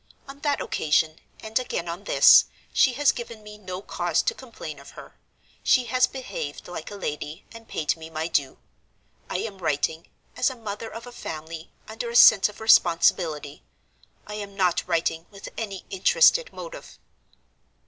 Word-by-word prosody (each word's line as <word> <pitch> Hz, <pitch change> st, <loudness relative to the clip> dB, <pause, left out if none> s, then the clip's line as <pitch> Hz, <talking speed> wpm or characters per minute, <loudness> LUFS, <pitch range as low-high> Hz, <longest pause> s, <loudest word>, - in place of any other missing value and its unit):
On 275 Hz, +1 st, -11 dB
that 285 Hz, -1 st, 0 dB
occasion, 155 Hz, +1 st, +1 dB, 0.2 s
and 220 Hz, +2 st, -1 dB
again 240 Hz, -8 st, -4 dB
on 175 Hz, +4 st, -6 dB
this, -, -, +7 dB, 0.3 s
she 260 Hz, -, +4 dB
has 285 Hz, +3 st, +3 dB
given 230 Hz, -2 st, -8 dB
me 210 Hz, 0 st, -11 dB
no 185 Hz, -1 st, -7 dB
cause -, -, 0 dB
to 480 Hz, -, 0 dB
complain 225 Hz, -, -9 dB
of 140 Hz, -, -13 dB
her. -, -, -12 dB, 0.5 s
She 255 Hz, -, +4 dB
has 250 Hz, +2 st, +3 dB
behaved 250 Hz, -, -6 dB
like 175 Hz, -3 st, -7 dB
a 205 Hz, -, -8 dB
lady, 150 Hz, -2 st, -5 dB
and 230 Hz, 0 st, -12 dB
paid 150 Hz, -, -1 dB
me 160 Hz, -1 st, -10 dB
my 160 Hz, 0 st, -3 dB
due. 140 Hz, -5 st, -1 dB, 0.7 s
I -, -, -2 dB
am 200 Hz, -4 st, -6 dB
writing, 160 Hz, 0 st, -1 dB, 0.3 s
as 250 Hz, +2 st, +2 dB
a 260 Hz, -, -7 dB
mother 220 Hz, -1 st, -6 dB
of 230 Hz, +1 st, -8 dB
a 245 Hz, -, -10 dB
family, 160 Hz, -5 st, -8 dB, 0.2 s
under 220 Hz, +2 st, -5 dB
a 235 Hz, -, -6 dB
sense 215 Hz, -4 st, +8 dB
of 210 Hz, -, -13 dB
responsibility—I 165 Hz, -3 st, +1 dB
am 205 Hz, -1 st, -7 dB
not 180 Hz, -3 st, +1 dB
writing 165 Hz, -1 st, -1 dB
with 200 Hz, -2 st, -10 dB
an 220 Hz, -3 st, -4 dB, 0.2 s
interested 485 Hz, -, +4 dB
motive. -, -, -10 dB
200 Hz, 165 wpm, -25 LUFS, 165-235 Hz, 0.7 s, sense